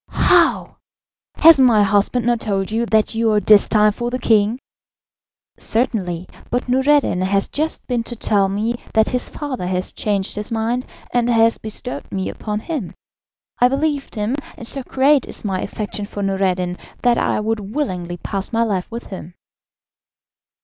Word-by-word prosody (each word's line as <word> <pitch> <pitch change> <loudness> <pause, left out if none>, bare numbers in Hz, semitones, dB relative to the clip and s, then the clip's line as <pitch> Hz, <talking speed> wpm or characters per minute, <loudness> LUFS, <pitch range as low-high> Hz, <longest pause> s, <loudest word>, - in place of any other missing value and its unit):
"How! - - +2 0.6
Has 325 -2 +7
my 235 -5 +5
husband 205 +4 +1
not 240 -1 +2
told 195 -2 -2
you 230 +2 0
that 220 0 +2
you 225 0 +1
are 210 - +4
destined 210 0 +4
for 240 +3 -3
the 250 - -2
king?" 220 -2 +2 1.0
"Certainly, 185 -7 -1 0.2
but 245 +1 -2
Noureddin 265 -6 +2
has 195 +1 +1
just 315 +2 -2
been 245 -2 -1
to 240 - -5
tell 200 -3 +1
me 220 +4 -1 0.2
that 220 0 +4
his 250 -1 -2
father 260 -11 -5
has 185 0 -2
changed 200 -2 -2
his 210 +2 -5
mind 230 +3 -1 0.3
and 245 0 +2
has 230 -1 +3
bestowed 205 -10 -6
me 190 -1 -2
upon 210 -1 -4
him. 280 - -5 0.6
I 245 - +6
believed 280 +1 -1
him, 215 +5 -1 0.2
and 235 - -8
so 270 +4 -4
great 270 +2 +2
is - - -5
my 190 -2 -1
affection 210 -1 -5
for 205 -1 -5
Noureddin 185 -2 -1 0.2
that 240 -1 +3
I - - 0
would 220 +1 -1
willingly 190 -6 -4
pass 195 +2 -4
my 230 0 +2
life 195 -5 -2
with 235 +1 -6
him." 180 -2 -8
220 Hz, 165 wpm, -19 LUFS, 195-245 Hz, 1.0 s, Has